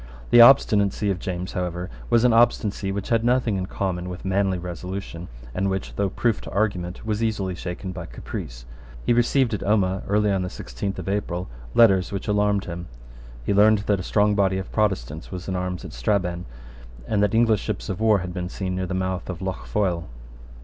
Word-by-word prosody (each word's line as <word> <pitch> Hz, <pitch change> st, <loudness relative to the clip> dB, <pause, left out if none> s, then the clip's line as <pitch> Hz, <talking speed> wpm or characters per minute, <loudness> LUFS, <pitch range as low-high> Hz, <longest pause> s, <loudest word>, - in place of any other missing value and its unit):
The 120 Hz, -, +9 dB
obstinacy 105 Hz, -5 st, +5 dB
of 90 Hz, -, -3 dB
James, 90 Hz, 0 st, -4 dB
however, 90 Hz, 0 st, -3 dB, 0.2 s
was 120 Hz, -1 st, +4 dB
an 125 Hz, -2 st, +5 dB
obstinacy 110 Hz, -4 st, +2 dB
which 100 Hz, 0 st, -4 dB
had 115 Hz, -1 st, +2 dB
nothing 120 Hz, -3 st, +2 dB
in 95 Hz, -1 st, -2 dB
common 90 Hz, -3 st, -3 dB
with 90 Hz, +1 st, -7 dB
manly 95 Hz, 0 st, +1 dB
resolution, 90 Hz, 0 st, -6 dB, 0.3 s
and 95 Hz, +6 st, 0 dB
which, 95 Hz, 0 st, -3 dB
though 100 Hz, -1 st, 0 dB
proof 115 Hz, +3 st, 0 dB
to -, -, -8 dB
argument, 95 Hz, -4 st, -2 dB
was 110 Hz, 0 st, -1 dB
easily 100 Hz, -4 st, -1 dB
shaken 90 Hz, +2 st, -5 dB
by 90 Hz, -2 st, -7 dB
caprice. -, -, -7 dB, 0.4 s
He -, -, +4 dB
received 120 Hz, 0 st, +2 dB
at 105 Hz, -, -2 dB
Omagh, 95 Hz, -2 st, +1 dB
early 105 Hz, +1 st, +2 dB
on 95 Hz, -1 st, +1 dB
the 90 Hz, -, -3 dB
sixteenth 90 Hz, +10 st, -5 dB
of -, -, -6 dB
April, 95 Hz, -3 st, -2 dB, 0.3 s
letters 95 Hz, -5 st, +5 dB
which 100 Hz, +1 st, -4 dB
alarmed 105 Hz, -1 st, +2 dB
him. 85 Hz, 0 st, -6 dB, 0.6 s
He -, -, +1 dB
learned 105 Hz, +1 st, +5 dB
that 100 Hz, -2 st, +2 dB
a -, -, -3 dB
strong 105 Hz, +2 st, +2 dB
body 95 Hz, -2 st, +2 dB
of 95 Hz, -, -5 dB
Protestants 80 Hz, -, -1 dB
was 90 Hz, -2 st, -6 dB
in 95 Hz, -, -2 dB
arms 90 Hz, 0 st, -3 dB
at -, -, -8 dB
Strabane, 90 Hz, +7 st, -1 dB, 0.6 s
and 100 Hz, -, +1 dB
that 105 Hz, +2 st, +2 dB
English 115 Hz, -2 st, +4 dB
ships -, -, -4 dB
of 95 Hz, -, -3 dB
war 110 Hz, -1 st, +4 dB
had 90 Hz, -, -6 dB
been 90 Hz, 0 st, -4 dB
seen 95 Hz, -1 st, -3 dB
near 95 Hz, 0 st, -2 dB
the 95 Hz, -, -3 dB
mouth 95 Hz, -1 st, -2 dB
of 90 Hz, -3 st, -4 dB
Lough 95 Hz, -1 st, -4 dB
Foyle. 90 Hz, -5 st, -1 dB
95 Hz, 200 wpm, -24 LUFS, 90-105 Hz, 0.6 s, The